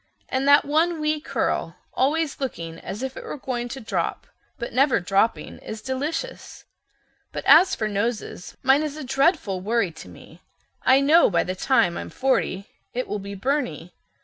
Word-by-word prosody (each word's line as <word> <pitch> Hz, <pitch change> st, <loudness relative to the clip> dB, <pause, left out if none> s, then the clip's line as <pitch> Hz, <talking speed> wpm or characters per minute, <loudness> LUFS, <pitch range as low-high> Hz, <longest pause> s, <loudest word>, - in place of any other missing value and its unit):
And 265 Hz, +1 st, 0 dB
that 285 Hz, +1 st, +6 dB
one 320 Hz, +3 st, +1 dB
wee 305 Hz, 0 st, 0 dB
curl, -, -, -2 dB, 0.2 s
always 295 Hz, +3 st, 0 dB
looking 165 Hz, -11 st, -5 dB
as 210 Hz, +6 st, -6 dB
if 265 Hz, 0 st, -4 dB
it -, -, -8 dB
were -, -, -6 dB
going 245 Hz, -3 st, -3 dB
to 265 Hz, -, -6 dB
drop, 225 Hz, -, -3 dB, 0.3 s
but 235 Hz, -, -6 dB
never 270 Hz, +1 st, +3 dB
dropping, 195 Hz, +5 st, 0 dB
is 220 Hz, -, -7 dB
delicious. 295 Hz, -, -4 dB, 0.7 s
But -, -, -6 dB
as 360 Hz, +4 st, +7 dB
for 215 Hz, -, -1 dB
noses, 210 Hz, -2 st, -3 dB
mine 270 Hz, +2 st, +5 dB
is 305 Hz, -1 st, -4 dB
a 305 Hz, -, -6 dB
dreadful 270 Hz, -, +1 dB
worry 215 Hz, -2 st, 0 dB
to 160 Hz, -, -12 dB
me. 90 Hz, -, -15 dB, 0.4 s
I 265 Hz, +1 st, +5 dB
know 310 Hz, +5 st, +5 dB
by 175 Hz, -, +2 dB
the 185 Hz, -, -3 dB
time 205 Hz, -3 st, +2 dB
I'm -, -, -6 dB
forty 255 Hz, -7 st, 0 dB, 0.3 s
it 250 Hz, -, -2 dB
will 210 Hz, -, -3 dB
be 200 Hz, 0 st, -7 dB
Byrney. 195 Hz, -, -2 dB
260 Hz, 175 wpm, -24 LUFS, 200-285 Hz, 0.7 s, as